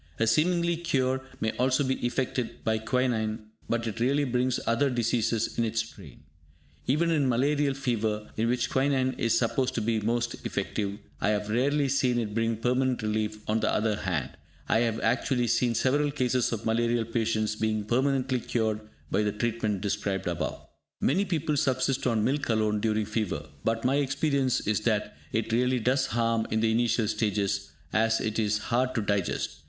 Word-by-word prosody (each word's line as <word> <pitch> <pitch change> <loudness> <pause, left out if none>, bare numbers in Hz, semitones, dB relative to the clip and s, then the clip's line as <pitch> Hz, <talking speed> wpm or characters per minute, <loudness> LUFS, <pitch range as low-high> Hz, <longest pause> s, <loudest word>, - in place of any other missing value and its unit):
A 115 - +3
seeming 170 +9 +3
cure 130 -6 0 0.2
may 110 - 0
also 130 +3 +2
be 130 -1 -1
effected 120 -1 -2
by 110 0 +1
quinine, 110 -2 -1 0.2
but 115 0 0
it 115 0 -4
really 140 +5 +2
brings 125 -1 0
other 125 +5 +2
diseases 115 -2 0
in - - +3
its 110 -1 0
train. 95 - -14 0.6
Even 165 +6 +2
in 145 -5 +2
malarial 140 +3 +2
fever, 110 -5 -2
in 115 +1 0
which 125 0 0
quinine 130 -1 +2
is 115 -1 +2
supposed 125 +2 0
to 115 - 0
be 110 0 +1
most 120 +2 -1
effective, 100 0 -2 0.2
I - - +1
have 105 0 0
rarely 140 +5 +2
seen 130 -2 +2
it 110 -3 -2
bring 115 0 0
permanent 125 +1 0
relief; 105 0 -2
on 110 +1 +1
the - - +1
other 110 -1 +1
hand, 95 -9 -2 0.4
I - - +3
have 115 -1 0
actually 125 +2 +1
seen 115 +1 +1
several 145 +4 +2
cases 130 -3 0
of 115 -1 -4
malarial 115 +1 +1
patients 110 -2 0
being 110 -1 0
permanently 130 +2 +1
cured 110 -2 -1 0.3
by - - +2
the 105 -1 +1
treatment 110 -2 -1
described 100 -1 -2
above. 85 -1 -3 0.3
Many 190 +9 +2
people 160 -5 -1
subsist 130 -1 +1
on 115 -3 +1
milk 140 +3 0
alone 110 -1 +2
during 110 0 0
fever, 90 -10 -2 0.2
but 115 +1 0
my 135 +2 +3
experience 140 -2 +1
is 105 0 0
that 110 -5 -1 0.2
it 115 0 -1
really 125 +2 +2
does 130 +4 +1
harm 115 -1 0
in 110 - +1
the 110 0 +2
initial 115 -1 +2
stages, 100 -2 -1 0.2
as 110 +1 +3
it 110 0 -2
is 105 -1 +1
hard 125 +3 0
to 115 - +1
digest. 100 -10 -1
115 Hz, 175 wpm, -28 LUFS, 110-130 Hz, 0.6 s, A